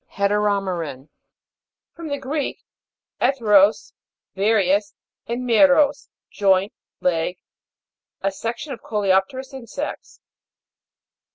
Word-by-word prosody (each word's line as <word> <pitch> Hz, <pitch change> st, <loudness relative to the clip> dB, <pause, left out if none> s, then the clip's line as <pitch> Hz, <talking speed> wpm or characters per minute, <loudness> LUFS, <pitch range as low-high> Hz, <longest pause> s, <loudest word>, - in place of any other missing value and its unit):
HETEROME'RAN. 195 Hz, -8 st, -1 dB, 0.8 s
From 335 Hz, -1 st, -8 dB
the 285 Hz, -1 st, -2 dB
Greek, 280 Hz, +1 st, -4 dB, 0.6 s
'eteros, 210 Hz, -6 st, +3 dB, 0.4 s
various, 200 Hz, 0 st, +1 dB, 0.3 s
and 245 Hz, +2 st, -3 dB
meros, 280 Hz, +4 st, +4 dB, 0.2 s
joint, 195 Hz, 0 st, +2 dB, 0.3 s
leg. 175 Hz, 0 st, 0 dB, 0.8 s
A 195 Hz, -, 0 dB
section 240 Hz, +9 st, -5 dB
of 240 Hz, -, -10 dB
coleop'terous 210 Hz, +6 st, 0 dB
insects. 265 Hz, +3 st, -7 dB
210 Hz, 80 wpm, -22 LUFS, 195-265 Hz, 0.8 s, meros